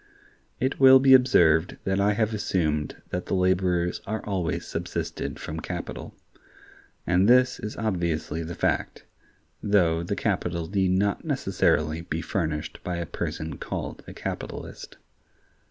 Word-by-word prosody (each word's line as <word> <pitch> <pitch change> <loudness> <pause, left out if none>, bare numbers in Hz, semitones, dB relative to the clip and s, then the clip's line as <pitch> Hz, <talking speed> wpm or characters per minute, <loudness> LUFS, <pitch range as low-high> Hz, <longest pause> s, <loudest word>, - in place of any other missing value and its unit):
It 130 +1 -1
will 130 -1 +9
be 135 0 +6
observed 85 -10 +4
that 95 0 0
I 105 +1 +3
have 110 +1 0
assumed 80 -8 -1
that 90 0 -3
the - - 0
laborers 90 -1 +1
are 110 +1 -3
always 95 -5 -2
subsisted - - -4
from 80 +1 -5
capital:(105) 85 +1 -8 0.6
and 90 +4 +3
this 125 +1 +4
is 105 - -6
obviously 85 -7 -1
the 85 +1 -6
fact, - - -1 0.6
though 90 -6 +2
the 85 - -3
capital 85 -2 -1
need 95 0 +1
not 100 +1 +1
necessarily 80 +1 0
be 80 -1 -4
furnished 80 -6 -3
by 90 - -3
a 85 - -3
person 80 -1 -5
called - - -5
a - - -8
capitalist. - - -7
90 Hz, 140 wpm, -26 LUFS, 80-105 Hz, 0.6 s, will